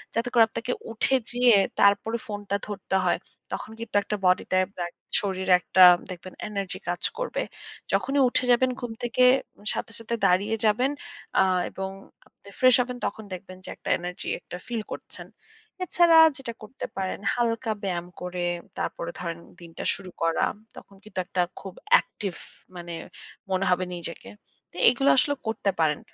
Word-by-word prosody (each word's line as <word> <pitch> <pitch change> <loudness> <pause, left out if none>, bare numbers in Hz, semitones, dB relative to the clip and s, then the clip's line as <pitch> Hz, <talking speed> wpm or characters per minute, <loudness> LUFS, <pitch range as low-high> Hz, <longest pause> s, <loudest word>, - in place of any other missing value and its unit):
যাতে 230 +2 0
করে 235 -2 +7
আপনাকে 240 +2 -4 0.2
উঠে 245 +4 +1 0.2
যেয়ে, 245 -2 +5 0.2
তারপরে 205 +3 +4
ফোনটা 205 -2 -3
ধরতে 195 -2 -2
হয়। 175 - +2 0.3
তখন - - -5
কিন্তু 230 -2 -7
একটা 210 - -2
body 180 0 +4
টায় 185 0 +3
ব্যা 175 - -2 0.4
শরীরে 190 -2 +1
একটা 185 - +5 0.3
দেখবেন 185 +1 -8
energy 200 -3 -3
কাজ 175 - -2 0.2
করবে। - - -2 0.5
যখনই 275 +1 +2
উঠে 255 - +2
যাবেন 255 +2 +4
ঘুম 245 -3 -5
থেকে 240 +1 +2 0.5
সাথে, - - -4
সাথে 230 +1 -3
দাঁড়িয়ে 200 +4 +3
যাবেন, 245 +6 +3 0.5
আ - - +6 0.3
এবং 190 0 -5 0.4
আপনি 200 - -18
ফ্রেশ 255 -1 +7
হবেন 250 0 -4
তখন 220 - -4
দেখবেন 185 0 -9
যে, - - -8
একটা - - -7
energy 180 +1 -6
একটা 180 - -8
feel 235 -3 -2
করছেন। - - -8 0.6
এছাড়া 345 -2 +5 0.2
যেটা 240 -3 -6
করতে 230 +5 -7
পারেন, 190 -1 -2
হালকা 230 -1 0
ব্যায়াম 175 -3 -2
করে, 180 0 -3 0.3
তারপরে 170 - -3
ধরেন 170 -1 -4 0.2
দিনটা 165 -1 -8
শুরু 190 -2 -10
করা, 165 0 +2 0.3
তখন 200 - -13
কিন্তু 210 -3 -6
একটা 180 0 0 0.2
খুব 195 -2 -8 0.3
active 195 -5 -6 0.4
মানে 170 -1 -7 0.6
মনে 190 +1 +1
হবে 180 0 +2
নিজেকে। 170 -1 -7 0.4
তো - - -23
এগুলো 270 +2 +2
আসলে 285 +2 +3
করতে 220 -2 0
পারেন। 150 -2 +2
200 Hz, 160 wpm, -26 LUFS, 180-235 Hz, 0.6 s, করে